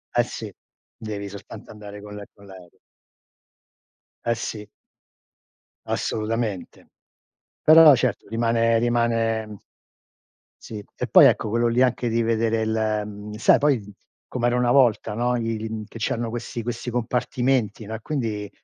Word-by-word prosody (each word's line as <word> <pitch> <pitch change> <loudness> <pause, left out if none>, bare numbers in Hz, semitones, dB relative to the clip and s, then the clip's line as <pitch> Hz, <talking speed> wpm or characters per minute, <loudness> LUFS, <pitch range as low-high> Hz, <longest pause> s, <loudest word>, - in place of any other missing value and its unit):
Eh - - +4
sì, - - -8 0.4
devi 105 -2 -6
soltanto 100 +2 -11
andare 105 -1 -10
con 105 0 -10
l'a 105 - -7
con 100 - -19
l'aereo. 95 -3 -15 1.5
Eh 115 0 +1
sì. 105 -2 -6 1.2
Assolutamente. 110 -3 -3 0.7
Però 155 -1 +8
certo 125 0 -2
rimane 115 0 +1
rimane, 115 -2 +1
mhmm 105 -2 -11 1.1
Sì. 105 -2 -7
E - - -3
poi - - +7
ecco 110 - +3
quello 120 +2 +1
lì 120 +2 +1
anche 125 -1 +1
di 115 +1 +1
vedere 115 -1 0
l 110 -1 0
mhmm, 105 0 -9
sai 110 - +4
poi 140 -7 +1 0.5
com'era 120 -1 0
una 125 -1 +2
volta, 120 -5 +3
no, 120 +2 0
il 115 -1 -3
mhmm, 110 -1 -5
che - - -10
c'erano 115 +1 -2
questi 120 0 -5
questi 120 +1 -4
compartimenti, 120 -2 -1
no, 110 - -7
e - - -7
quindi, 110 -7 -3
115 Hz, 140 wpm, -23 LUFS, 105-120 Hz, 1.5 s, Però